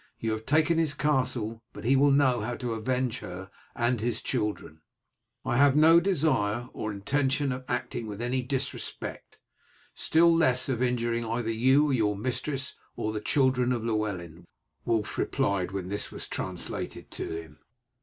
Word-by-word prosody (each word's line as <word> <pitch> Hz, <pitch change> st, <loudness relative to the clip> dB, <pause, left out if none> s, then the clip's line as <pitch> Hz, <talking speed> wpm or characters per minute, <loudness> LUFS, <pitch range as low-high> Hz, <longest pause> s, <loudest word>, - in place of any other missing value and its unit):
You 115 Hz, -, -2 dB
have 110 Hz, 0 st, -4 dB
taken 155 Hz, +3 st, +3 dB
his 155 Hz, -3 st, +1 dB
castle, 125 Hz, -6 st, 0 dB
but -, -, -9 dB
he 130 Hz, +4 st, +4 dB
will 140 Hz, +2 st, +5 dB
know 135 Hz, -4 st, +3 dB
how 120 Hz, +3 st, -3 dB
to 120 Hz, -2 st, -3 dB
avenge 125 Hz, +2 st, -1 dB
her 95 Hz, +1 st, -8 dB, 0.2 s
and 120 Hz, -1 st, +1 dB
his 120 Hz, +1 st, -1 dB
children." 105 Hz, -, -3 dB, 0.6 s
"I 125 Hz, -2 st, +1 dB
have 140 Hz, 0 st, +5 dB
no 160 Hz, +2 st, +7 dB
desire 130 Hz, -, +1 dB
or 110 Hz, -, -3 dB
intention 135 Hz, +7 st, 0 dB
of 130 Hz, 0 st, -5 dB
acting 125 Hz, -2 st, -3 dB
with 105 Hz, -1 st, -6 dB
any 125 Hz, +2 st, 0 dB
disrespect, 130 Hz, 0 st, -5 dB, 0.6 s
still 165 Hz, +1 st, +4 dB
less 130 Hz, -7 st, +3 dB
of 125 Hz, -2 st, -1 dB
injuring 120 Hz, -2 st, 0 dB
either 115 Hz, 0 st, -2 dB
your 125 Hz, -3 st, +3 dB
mistress 135 Hz, +5 st, -3 dB, 0.2 s
or 110 Hz, -, -2 dB
the 105 Hz, -, -3 dB
children 130 Hz, 0 st, +2 dB
of 120 Hz, -3 st, -1 dB
Llewellyn," 100 Hz, -7 st, -3 dB, 0.4 s
Wulf 110 Hz, -3 st, 0 dB
replied, 95 Hz, -3 st, 0 dB
when 95 Hz, -2 st, -4 dB
this 100 Hz, +1 st, -3 dB
was -, -, -6 dB
translated 90 Hz, -1 st, -5 dB
to -, -, -4 dB
him. 80 Hz, -2 st, -13 dB
120 Hz, 155 wpm, -28 LUFS, 110-135 Hz, 0.6 s, no